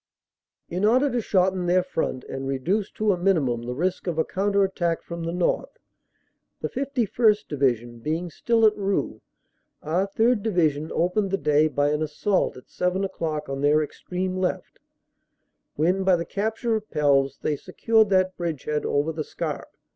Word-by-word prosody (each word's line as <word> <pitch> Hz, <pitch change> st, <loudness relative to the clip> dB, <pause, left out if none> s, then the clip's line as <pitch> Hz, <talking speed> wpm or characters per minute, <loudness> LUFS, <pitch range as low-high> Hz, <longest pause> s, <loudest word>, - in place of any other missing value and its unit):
In 180 Hz, +3 st, -3 dB
order 255 Hz, +6 st, +4 dB
to 245 Hz, -, 0 dB
shorten 185 Hz, -3 st, +1 dB
their 180 Hz, +1 st, +3 dB
front 160 Hz, -7 st, -2 dB
and 135 Hz, 0 st, -5 dB
reduce 170 Hz, +10 st, -1 dB
to 215 Hz, -1 st, +1 dB
a 185 Hz, -, 0 dB
minimum 155 Hz, -11 st, +1 dB
the 125 Hz, +1 st, -5 dB
risk 180 Hz, +6 st, -1 dB
of 170 Hz, -2 st, -1 dB
a 160 Hz, -, +2 dB
counter 200 Hz, +1 st, +1 dB
attack 175 Hz, -3 st, -1 dB
from 170 Hz, -1 st, -6 dB
the 165 Hz, -, -2 dB
north 175 Hz, 0 st, -1 dB, 0.8 s
(the -, -, -3 dB
51 245 Hz, -5 st, +2 dB
St. 210 Hz, -, -21 dB
Division 120 Hz, -4 st, 0 dB
being 160 Hz, +7 st, -3 dB
still 225 Hz, +7 st, +2 dB
at 215 Hz, -1 st, +5 dB
Roeux), 200 Hz, -1 st, -2 dB, 0.6 s
our 175 Hz, +6 st, 0 dB
3rd. 225 Hz, +3 st, +2 dB
Division 160 Hz, -7 st, +1 dB
opened 190 Hz, +4 st, +1 dB
the 195 Hz, -, 0 dB
day 150 Hz, -2 st, +3 dB
by 145 Hz, 0 st, +1 dB
an 150 Hz, +1 st, -1 dB
assault 155 Hz, +5 st, 0 dB
at 125 Hz, -, -14 dB
seven 180 Hz, +2 st, -1 dB
o -, -, -3 dB
clock 155 Hz, -4 st, -3 dB
on 135 Hz, 0 st, -4 dB
their 150 Hz, +2 st, +4 dB
extreme 185 Hz, +4 st, -4 dB
left, 185 Hz, -1 st, -3 dB, 1.0 s
when 180 Hz, +6 st, +1 dB
by 190 Hz, -1 st, +4 dB
the 170 Hz, -1 st, -3 dB
cap 215 Hz, +3 st, -2 dB
ture 235 Hz, 0 st, -1 dB
of 215 Hz, 0 st, -4 dB
Pelves 140 Hz, -2 st, +2 dB
they 150 Hz, -, -1 dB
secured 220 Hz, +8 st, +2 dB
that 185 Hz, -1 st, +2 dB
bridgehead 150 Hz, -3 st, -2 dB
over 145 Hz, +3 st, +1 dB
the 155 Hz, 0 st, -3 dB
Scarpe. -, -, -5 dB
180 Hz, 175 wpm, -25 LUFS, 150-200 Hz, 1.0 s, at